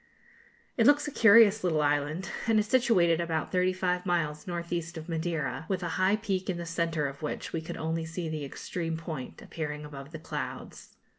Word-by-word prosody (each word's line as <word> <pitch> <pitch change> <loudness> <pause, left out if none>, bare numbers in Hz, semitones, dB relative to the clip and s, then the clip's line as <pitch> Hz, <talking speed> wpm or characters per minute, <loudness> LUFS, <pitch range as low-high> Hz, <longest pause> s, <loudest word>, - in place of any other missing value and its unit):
It 230 -1 +5
looks 290 +1 +5
a - - -3
curious 220 -3 +6
little 160 -4 +2
island, 145 +5 0 0.2
and 225 -1 +4
is 210 - +3
situated 210 -9 +3
about 160 -2 -2
thirty 185 0 +3
five 180 -1 -1
miles 160 -4 -1
north 170 -1 -4
east 170 0 -3
of 160 +1 -7
Madeira, 160 -2 -2
with 190 -2 -1
a 170 - -2
high 185 +4 +2
peak 195 -4 -2
in 180 - -1
the 170 - -5
centre, 165 -2 -1
of 140 0 -5
which 150 - -4
we 165 - -1
could 160 - -6
only 160 0 -2
see 165 +1 -4
the 155 -2 -3
extreme 165 +3 -4
point, 160 -6 -7
appearing 150 -2 -5
above 140 0 -9
the 160 - -6
clouds. 160 - -6
170 Hz, 200 wpm, -29 LUFS, 160-185 Hz, 0.2 s, curious